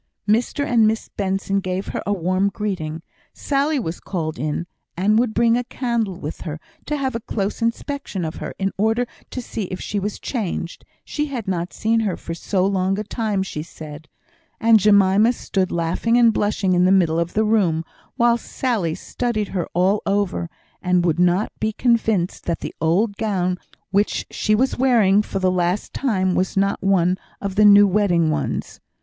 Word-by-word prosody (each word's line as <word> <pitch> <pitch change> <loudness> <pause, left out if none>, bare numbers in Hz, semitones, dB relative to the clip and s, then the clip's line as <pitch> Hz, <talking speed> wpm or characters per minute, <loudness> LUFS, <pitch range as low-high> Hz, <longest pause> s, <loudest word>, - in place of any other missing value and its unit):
Mr 235 +7 +1
and 230 -4 +4
Miss 220 +1 -1
Benson 195 0 -1
gave 185 0 -3
her - - -3
a - - +1
warm 185 +1 +1
greeting. 175 -7 -4 0.3
Sally 285 +2 0
was 175 -9 -3
called 160 -7 -4
in, 150 +4 -2 0.3
and 210 +4 +3
would 240 -2 +1
bring 235 0 +4
a 245 - 0
candle 235 -8 -2
with 150 -1 -6
her, 155 -1 -5 0.3
to 300 - -1
have 265 -2 -1
a 230 - -2
close 205 -1 -3
inspection 230 - -2
of 160 - -5
her, - - -6
in 195 0 -1
order 225 +4 +2 0.2
to 255 - -5
see 220 -3 -4
if 185 0 -6
she 205 - -3
was 205 +1 -4
changed 190 -8 -4 0.2
she 300 0 -2
had 245 -7 -5
not 175 -2 -2
seen 225 +1 +1
her 205 -6 -1
for 165 - -6
so 185 +2 0
long 195 0 +1
a 210 - -2
time, 215 -2 -1
she 155 -5 -5
said; 155 -1 -10 0.5
and 225 -1 +5
Jemima 205 +2 +5
stood 190 -5 -2
laughing 170 +8 +1
and 235 -2 +5
blushing 205 -3 +1
in 180 0 +4
the 185 - +4
middle 170 -4 +3
of 170 +1 -2
the 215 - +3
room, 180 -7 +2 0.3
while 235 0 +3
Sally 220 -9 -2
studied 215 +1 -2
her 180 -3 -2
all 190 +4 +3
over, 195 -4 0 0.3
and 180 -1 +2
would 165 -1 +1
not 180 +3 +2
be 215 0 -1
convinced 220 -6 +1
that 170 - -2
the - - -5
old 200 +6 +1
gown 185 -4 -1 0.3
which 200 +2 +1
she 215 - +1
was 255 +3 0
wearing 220 -6 +4
for 210 - -5
the 185 -1 +2
last 180 +2 -1
time 190 -8 0
was 185 +2 -1
not 195 0 +1
one 185 -1 +2 0.2
of 200 -1 -3
the 210 +2 +4
new 205 0 +8
wedding 180 -5 +2
ones. - - -3
200 Hz, 185 wpm, -21 LUFS, 180-225 Hz, 0.5 s, new